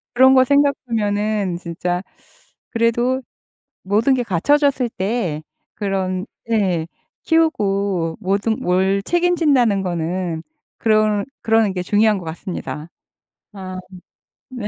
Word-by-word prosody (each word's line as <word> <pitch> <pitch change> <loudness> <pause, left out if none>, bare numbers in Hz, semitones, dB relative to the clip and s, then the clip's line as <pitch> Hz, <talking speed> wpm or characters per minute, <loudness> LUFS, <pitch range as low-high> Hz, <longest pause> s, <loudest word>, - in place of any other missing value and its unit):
그런 260 +2 +7
거 260 0 +6
생각하면은 215 -8 +1
진짜 175 +1 -3 0.7
그래도 240 +3 +1 0.6
모든 215 +7 +2
게 250 -2 +1
갖춰졌을 260 - +2
때 190 -7 -2 0.3
그런 190 -2 -2 0.3
예 185 -7 +1 0.4
키우고 200 - +1
뭐든 200 +4 0
뭘 190 +2 +1
책임진다는 300 - +2
거는 175 -1 -2 0.4
그런 215 -2 +2 0.2
그러는 225 -3 +2
게 180 -1 -3
중요한 210 +2 +3
것 175 - -10
같습니다. 160 -1 -6 0.6
아. 185 -2 -7 0.7
네. 245 -5 -5
205 Hz, 215 characters per minute, -20 LUFS, 185-240 Hz, 0.7 s, 그런